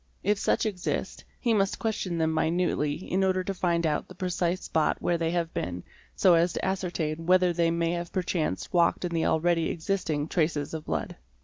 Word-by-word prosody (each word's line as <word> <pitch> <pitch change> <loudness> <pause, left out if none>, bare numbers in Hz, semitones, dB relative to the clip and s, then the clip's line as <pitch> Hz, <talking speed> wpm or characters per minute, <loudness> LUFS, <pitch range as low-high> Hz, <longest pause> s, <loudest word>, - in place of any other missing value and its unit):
If 205 +1 +2
such - - +1
exist, 195 -4 -3 0.2
he 235 -2 +1
must 195 -2 +1
question 205 -6 -2
them 160 -1 +1
minutely 160 -2 +1
in 190 +3 -1
order 185 -1 +1
to 195 - -3
find 170 -2 0
out 150 -2 0
the - - -12
precise 180 -1 -1
spot 160 - +1
where 175 -1 0
they 165 -1 0
have 170 -1 -1
been 90 +1 -3 0.3
so 185 - +5
as 170 +1 +3
to - - -3
ascertain 170 -4 -2
whether 180 -1 +4
they 170 0 +2
may 170 0 0
have 170 0 -3
perchance 175 - -2
walked 175 +1 +3
in 175 - -3
the 165 -1 0
already 165 0 +2
existing 160 -4 -1
traces 155 -4 0
of 160 -1 -5
blood. - - -3
170 Hz, 195 wpm, -27 LUFS, 160-185 Hz, 0.3 s, so